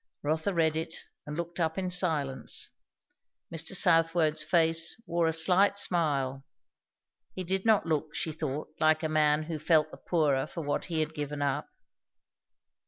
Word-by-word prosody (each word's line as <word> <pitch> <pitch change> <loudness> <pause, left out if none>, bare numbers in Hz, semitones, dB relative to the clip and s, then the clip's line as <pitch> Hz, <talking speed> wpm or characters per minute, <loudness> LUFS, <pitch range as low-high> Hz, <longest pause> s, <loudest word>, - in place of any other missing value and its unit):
Rotha 160 +6 0
read 160 -3 +1
it, 160 +1 -4 0.3
and 150 +1 -5
looked 170 +1 -5
up 160 0 0
in 185 -1 -2
silence. 160 -7 +1 0.8
Mr. 165 +3 -1
Southwode's 165 -3 +3
face 165 +2 +1
wore 170 -1 0
a - - +2
slight 185 +5 +3
smile. 140 -8 +1 0.9
He 185 - -4
did 190 +4 -2
not 220 -5 +4
look, 155 -1 -2
she 160 - -2
thought, 150 -2 -4
like 155 0 +3
a - - +1
man 155 0 +2
who 155 0 -5
felt 155 0 +2
the - - -10
poorer 145 -6 0
for 170 - -6
what 145 - -2
he 165 -3 -1
had 155 0 -2
given 145 -1 -4
up. 140 -1 -1
160 Hz, 160 wpm, -29 LUFS, 150-170 Hz, 0.9 s, not